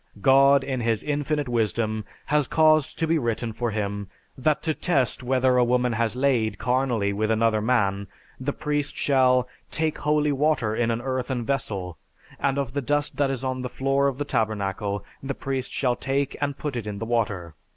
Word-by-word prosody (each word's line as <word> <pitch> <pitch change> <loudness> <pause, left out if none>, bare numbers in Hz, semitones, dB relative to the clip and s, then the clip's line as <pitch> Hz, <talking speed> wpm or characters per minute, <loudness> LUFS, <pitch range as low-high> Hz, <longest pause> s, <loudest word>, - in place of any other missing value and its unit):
God 135 +3 +5
in 130 -2 -2
His 115 -2 0
infinite 145 0 -1
wisdom 110 -2 -1 0.2
had 150 -2 +1
caused 155 -2 +3
to 165 - +1
be 160 0 +2
written 115 -2 -2
for 120 +2 -2
Him, 100 -2 -3 0.3
that 150 +3 0
to 160 - 0
test 140 -8 0
whether 130 0 +2
a - - +5
woman 125 0 +2
has 115 0 0
laid 125 -6 +1
carnally 120 -4 0
with 110 +2 -1
another 110 -1 +2
man, 100 -4 +1 0.3
the 135 +2 -1
priest 145 -1 -2
shall, 130 -2 +3 0.2
"take 160 -1 -1
holy 150 0 +2
water 140 -6 +1
in 120 0 +1
an 115 0 -1
earthen 130 -2 -2
vessel, 105 -11 -3 0.4
and 135 0 +1
of 135 -3 -2
the 140 - -1
dust 145 +2 -1
that 140 -1 +2
is 135 -1 -3
on 130 -1 -2
the 125 - -4
floor 135 +2 +1
of 135 -2 -2
the 145 - -2
tabernacle 100 -4 -1 0.2
the 135 0 -4
priest 135 -2 -3
shall 125 -3 +1
take 135 +1 -1
and 145 -1 -1
put 145 -4 -4
it 115 -3 -4
in 105 -1 -4
the 115 - -4
water 100 -8 -1
130 Hz, 190 wpm, -25 LUFS, 110-140 Hz, 0.4 s, God